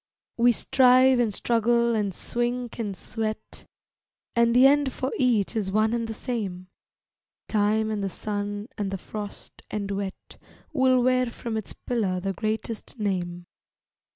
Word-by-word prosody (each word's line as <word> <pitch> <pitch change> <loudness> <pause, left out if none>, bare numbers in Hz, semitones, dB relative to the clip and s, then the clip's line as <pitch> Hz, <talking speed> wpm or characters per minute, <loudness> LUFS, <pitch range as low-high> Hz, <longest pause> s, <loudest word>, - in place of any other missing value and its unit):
We 240 +1 +5
strive 255 +1 +5
and 235 -3 +2
struggle 235 +2 +2
and 210 -3 0
swink 240 +5 -3
and 205 -4 -3
sweat, 215 -1 -5 0.7
And 235 0 +3
the 255 +2 +7
end 285 0 +4
for 260 +1 -3
each 235 -5 +2
is 200 -4 -1
one 215 +2 +2
and 230 -1 -1
the 225 - -4
same; 195 -7 -4 0.8
Time 215 +1 +1
and 210 -2 -2
the 195 - -1
sun 205 +2 -4
and 200 -2 -1
the 195 - -3
frost 205 +2 -8
and 200 -1 -3
wet 195 -1 -5 0.4
Will 260 -3 +4
wear 255 0 +3
from 235 -1 -5
its 220 -2 -4
pillar 205 -7 -1
the 195 +1 -2
greatest 220 +2 -4
name. 175 -4 -2
220 Hz, 150 wpm, -26 LUFS, 205-240 Hz, 0.8 s, the